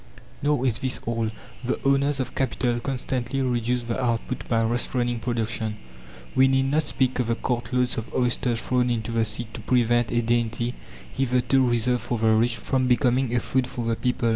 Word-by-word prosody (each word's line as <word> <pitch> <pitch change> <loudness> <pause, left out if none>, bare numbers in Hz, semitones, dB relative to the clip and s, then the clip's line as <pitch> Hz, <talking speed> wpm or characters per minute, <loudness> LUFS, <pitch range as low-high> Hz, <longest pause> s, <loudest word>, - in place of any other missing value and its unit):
Nor 145 -2 +1
is 120 -3 +2
this 130 -1 +1
all. 115 -1 -1 0.3
The 125 - -1
owners 140 +1 +2
of 130 - -3
capital 120 -2 0
constantly 130 0 -3
reduce 125 -1 0
the 120 +2 -2
output 120 +1 -2
by 115 -1 +2
restraining 120 +1 0
production. 115 -2 -2 0.6
We 130 0 +5
need 135 0 +2
not 155 +2 +3
speak 130 -4 0
of 125 - 0
the 115 - +1
cartloads 125 0 -1
of 110 - -8
oysters 120 -1 +1
thrown 125 +1 +1
into 115 -1 -2
the 115 -1 +1
sea 115 +2 -3
to - - -7
prevent 120 0 +2
a 120 0 +1
dainty, 120 +1 0 0.4
hitherto 130 0 +2
reserved 120 +1 +1
for 120 - -2
the 110 0 +2
rich, 115 +2 +3
from 130 +4 0
becoming 125 0 +2
a - - +3
food 130 +1 0
for 125 -2 -3
the 115 0 +1
people. 125 -1 0
120 Hz, 185 wpm, -25 LUFS, 115-130 Hz, 0.6 s, We